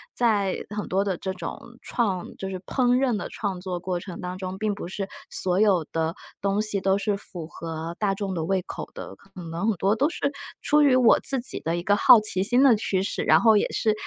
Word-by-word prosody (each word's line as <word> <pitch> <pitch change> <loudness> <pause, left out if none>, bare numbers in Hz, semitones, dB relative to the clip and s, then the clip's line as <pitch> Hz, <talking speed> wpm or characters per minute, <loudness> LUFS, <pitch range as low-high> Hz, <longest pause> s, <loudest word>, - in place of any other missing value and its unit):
在 205 -6 +2
很 210 0 -4
多 190 +2 +1
的 195 -4 -2
这 190 -1 -4
种 180 -3 -6 0.2
创 195 -7 -1
就 195 - -5
是 190 - -4
烹 245 +4 +1
饪 260 -1 +2
的 - - -4
创 195 -4 -4
作 180 -1 -4
过 180 0 -3
程 180 -1 -8
当 180 0 -5
中， 185 0 -5
并 215 0 -1
不 200 - -7
是 195 +1 -4 0.2
所 185 +1 -1
有 190 -7 +3
的 165 0 -1 0.3
东 200 +1 +1
西 215 -2 0
都 195 +1 +2
是 200 0 -1
符 175 -5 -6
合 165 0 -6
大 200 -2 +1
众 195 -1 -3
的 165 - -2
胃 190 0 0
口 - - -8
的， - - -8
可 - - -23 0.2
能 170 +6 -2
很 220 - +2
多 195 +4 +1
都 280 +7 +1
是 280 -4 -2 0.3
出 300 0 +3
于 275 -3 +5
我 250 -3 +5
自 265 -3 +1
己 - - -3
的 165 +1 -2
一 175 - -3
个 205 +1 +2
好 220 0 +7
奇 190 -3 +2
心 245 +6 +5
的 270 -4 +7
驱 190 -3 0
使。 195 - -2
然 - - +5
后 220 -2 +6
也 - - +1
是 220 -2 +1
195 Hz, 255 characters per minute, -25 LUFS, 185-215 Hz, 0.3 s, 好